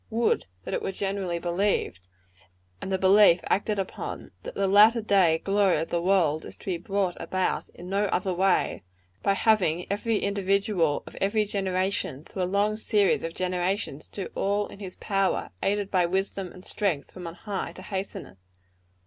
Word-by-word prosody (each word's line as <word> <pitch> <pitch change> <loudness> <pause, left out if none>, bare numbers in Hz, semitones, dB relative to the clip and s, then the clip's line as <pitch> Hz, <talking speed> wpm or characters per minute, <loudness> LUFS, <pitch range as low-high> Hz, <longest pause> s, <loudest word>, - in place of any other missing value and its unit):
Would 230 - +1 0.2
that - - -5
it - - -1
were - - -2
generally 195 -2 -2
believed 175 - -1 0.7
and 195 - -4
the 190 - +2
belief 190 -1 +6
acted 210 +1 0
upon 195 -1 -5
that - - -8
the 195 - +1
latter 210 +4 +6
day 195 -7 +3
glory 195 +1 +2
of 165 - -2
the 170 - 0
world 170 -5 +2
is - - -10
to - - -16
be 185 -3 -1
brought 195 0 -1
about 185 0 -1
in 175 - -10
no 200 +2 +1
other 190 -1 0
way 190 +1 +1
than 90 +1 -39
by 200 - +2
having 185 -6 +2
every 210 +2 0
individual 200 -5 +1
of - - -11
every 210 +2 +2
generation, 190 -7 -1
through 185 - -6
a - - +2
long 200 +3 +1
series 210 -2 +2
of 165 0 -4
generations, 180 -4 -2
do 195 - -6
all 205 +1 0
in - - -12
his 190 -3 -7
power, 195 -1 0
aided 200 0 0
by 180 -2 +3
wisdom 190 0 -2
and 185 - -14
strength 175 -9 -2
from 180 -2 -8
on 165 - -7
high, 200 0 -4
to 185 - -9
hasten 190 +1 -4
it. 95 - -17
195 Hz, 185 wpm, -27 LUFS, 175-200 Hz, 0.7 s, belief